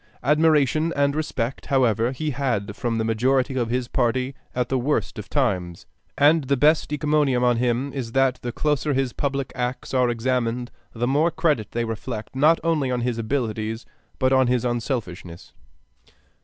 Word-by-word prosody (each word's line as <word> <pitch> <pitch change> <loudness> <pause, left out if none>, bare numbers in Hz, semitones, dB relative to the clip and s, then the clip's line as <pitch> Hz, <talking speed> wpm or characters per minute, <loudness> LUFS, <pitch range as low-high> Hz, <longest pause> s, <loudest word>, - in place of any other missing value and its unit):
Admiration 155 +2 +3
and 140 0 +1
respect, 135 -5 -3
however, 120 -3 +2
he 150 +3 -3
had 120 -7 -2
from 115 -2 -2
the 110 - 0
majority 125 +4 +1
of 120 -3 -1
his 125 0 -1
party 125 +2 0 0.2
at 125 -1 0
the 130 +1 0
worst 125 -3 -1
of 105 - -8
times; 95 - -1 0.3
and 150 +1 +4
the 140 +1 +1
best 150 +3 +3
encomium 150 -4 +1
on 120 -1 +3
him 125 +3 0
is 120 -4 -5
that 135 -1 +2
the 120 - -4
closer 150 +2 0
his 130 -2 0
public 140 -2 -2
acts 125 +1 -3
are 125 -2 +3
examined, 120 0 -1 0.2
the 120 +1 -1
more 145 +6 +2
credit 155 - 0
they 120 0 -1
reflect 115 +1 -6
not 155 +5 +4
only 160 -5 +1
on 125 -1 -1
his 120 -1 -1
abilities 110 -2 -2 0.3
but 130 0 +2
on 130 -1 +4
his 125 0 +1
unselfishness. 115 - -4
125 Hz, 170 wpm, -23 LUFS, 115-140 Hz, 0.3 s, and